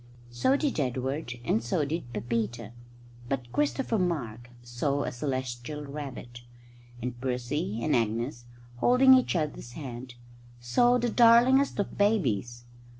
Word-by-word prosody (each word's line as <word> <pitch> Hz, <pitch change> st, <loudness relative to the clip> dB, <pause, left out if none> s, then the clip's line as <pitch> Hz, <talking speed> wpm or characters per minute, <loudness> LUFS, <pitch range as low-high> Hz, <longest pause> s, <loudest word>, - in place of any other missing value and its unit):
So 190 Hz, -, +2 dB
did 285 Hz, -, -1 dB
Edward 130 Hz, +1 st, -2 dB
and 110 Hz, -, +1 dB
so 145 Hz, +6 st, 0 dB
did 145 Hz, -4 st, -4 dB
Pepita; 115 Hz, 0 st, -3 dB, 0.6 s
but 125 Hz, -3 st, -3 dB
Christopher 270 Hz, -6 st, 0 dB
Mark 120 Hz, -10 st, -2 dB
saw 140 Hz, +4 st, -1 dB
a -, -, -3 dB
celestial 130 Hz, +2 st, -4 dB
rabbit; 135 Hz, -4 st, -8 dB, 0.6 s
and 120 Hz, -1 st, -5 dB
Percy 125 Hz, -3 st, -2 dB
and -, -, +2 dB
Agnes, 120 Hz, +2 st, -1 dB, 0.3 s
holding 255 Hz, -, +6 dB
each 255 Hz, -6 st, +3 dB
other's 150 Hz, -7 st, -3 dB
hand, 125 Hz, -3 st, -8 dB, 0.4 s
saw 240 Hz, -, +3 dB
the 240 Hz, -1 st, -1 dB
darlingest 245 Hz, +4 st, +5 dB
of 205 Hz, -1 st, -3 dB
babies. 120 Hz, -, +1 dB
130 Hz, 125 wpm, -28 LUFS, 120-180 Hz, 0.6 s, holding